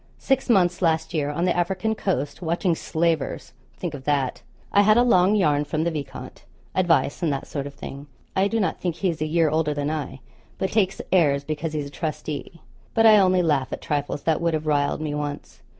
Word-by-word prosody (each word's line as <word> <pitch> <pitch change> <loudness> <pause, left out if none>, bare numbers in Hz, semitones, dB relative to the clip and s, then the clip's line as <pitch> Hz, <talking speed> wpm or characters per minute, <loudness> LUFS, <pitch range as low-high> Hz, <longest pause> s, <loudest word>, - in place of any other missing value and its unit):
Six 265 -1 0
months, 185 -4 +3
last 160 -1 +1
year, 145 -3 0
on 160 +4 -1
the 180 - +1
African 185 +5 0
coast, 180 -10 -2
watching 170 +1 0
slavers 160 -5 -1 0.2
think 175 -4 -4
of 140 -2 -7
that! 140 -3 0 0.3
I 200 - +5
had 215 +2 +5
a 240 - +6
long 195 -4 +4
yarn 150 -7 +2
from 155 +1 -2
the 170 - 0
viscount 150 -4 -7 0.3
advice, 165 -6 +2
and 165 -4 +1
that 135 - -3
sort 140 -1 -4
of 140 - -10
thing. 140 0 -8 0.3
I 190 +1 +3
do 225 +2 -1
not 195 - -1
think 175 -3 -1
he 185 +2 0
is 160 - -8
a 155 - 0
year 160 -1 +2
older 155 -1 0
than 145 +1 -1
I, 140 -4 -5 0.4
but 190 - -2
takes 195 -3 +1
airs 145 -6 +3
because 155 +2 -4
he's 150 -2 -2
a - - -7
trustee. 155 +1 -5 0.3
But 225 - +4
I 215 -2 +8
only 185 -2 +3
laugh 145 -5 +1
at - - -4
trifles 145 -1 -2
that 160 -1 +1
would 170 -1 +1
have 155 0 -3
riled 145 0 +1
me 150 -2 -2
once. 145 -1 -5
160 Hz, 215 wpm, -24 LUFS, 145-185 Hz, 0.4 s, I